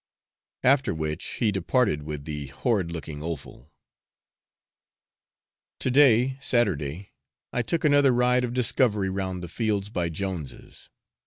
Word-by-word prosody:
After 135 - +3
which 80 -1 -3 0.2
he 110 - +2
departed 100 - +1
with 75 -1 -6
the 75 -2 -5
horrid 95 - -1
looking 80 -3 -6
offal. 75 -3 -7 2.1
To 130 - -1
day 130 -1 +4
Saturday 95 - 0 0.4
I 125 - +1
took 165 +9 -2
another 145 -2 +5
ride 125 +1 +3
of 120 - -2
discovery 110 -5 +2
round 95 -2 -3
the - - -5
fields 105 0 -1
by 85 -5 -1
Jones's. 80 -5 -6
100 Hz, 120 wpm, -26 LUFS, 80-125 Hz, 2.1 s, another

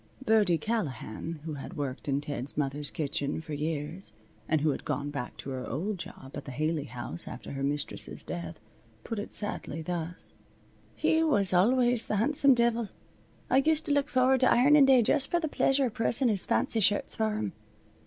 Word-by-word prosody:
Birdie 210 -7 +4
Callahan, 155 - -4
who 160 - -4
had 140 +1 -8
worked 140 -1 -4
in 140 0 0
Ted's 145 -2 -5
mother's 145 0 -2
kitchen 145 -1 -2
for 160 -1 -7
years, 155 +4 -4 0.4
and 155 -2 +2
who 155 0 +3
had - - -5
gone 145 -1 -3
back 125 -4 -5
to 135 - -7
her 130 -1 -5
old 190 +7 -3
job 135 -4 -9
at - - -7
the 135 - -7
Haley 155 +2 -1
House 120 - -4
after - - -8
her 135 - -5
mistress's 145 +1 -2
death, 85 +2 -6 0.4
put 225 - -4
it 205 - -6
sadly, 165 -6 -3
thus: 175 +1 -4 0.6
"He 320 - +2
was 205 -13 +2
always 240 +5 +3
th' - - -3
han'some 280 +4 +4
divil. 235 -2 +1 0.6
I 260 - +3
used 310 +3 +2
to - - -1
look 285 0 +2
forward 260 -1 +3
to 255 - +4
ironin' 280 +3 +6
day 260 -3 +6
just 270 +5 +1
for 345 - +2
the 320 - -1
pleasure 275 -2 +2
of 235 - -3
pressin' 235 +2 +2
his 200 -4 +4
fancy 225 - +2
shirts 205 0 +2
for 220 -2 0
him. 105 -2 -3
180 Hz, 190 wpm, -29 LUFS, 145-240 Hz, 0.6 s, ironin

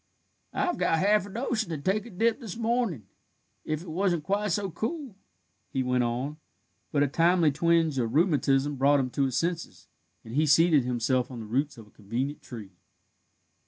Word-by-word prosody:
I've 355 - 0
got 165 - +2
half 205 +3 +3
a - - -10
notion 220 -1 -2
to 160 - -3
take 195 +9 -1
a - - -10
dip 225 +5 +1
this 225 -6 -7
mornin', 230 - -1 0.6
if 155 +1 -3
it - - -12
wasn't 175 -2 0
quite 200 +4 0
so 195 +1 -1
cool," 240 - -4 0.5
he 130 - -1
went 125 0 +1
on, 125 +5 -2 0.5
but 145 -1 +3
a - - +2
timely 165 +2 +3
twinge 160 -1 +2
of 115 -2 -1
rheumatism 145 -4 +2
brought 140 +2 +4
him 130 -2 -1
to 140 - +1
his 130 -1 -1
senses, 170 +1 -3 0.4
and 110 - -9
he 155 +3 +2
seated 150 -2 +5
himself 125 +1 0
on 125 -3 -7
the 110 - -7
roots 135 +5 -1
of 115 - -11
a 105 - -22
convenient 120 +8 -4
tree. 110 -6 -9
155 Hz, 185 wpm, -27 LUFS, 130-195 Hz, 0.6 s, seated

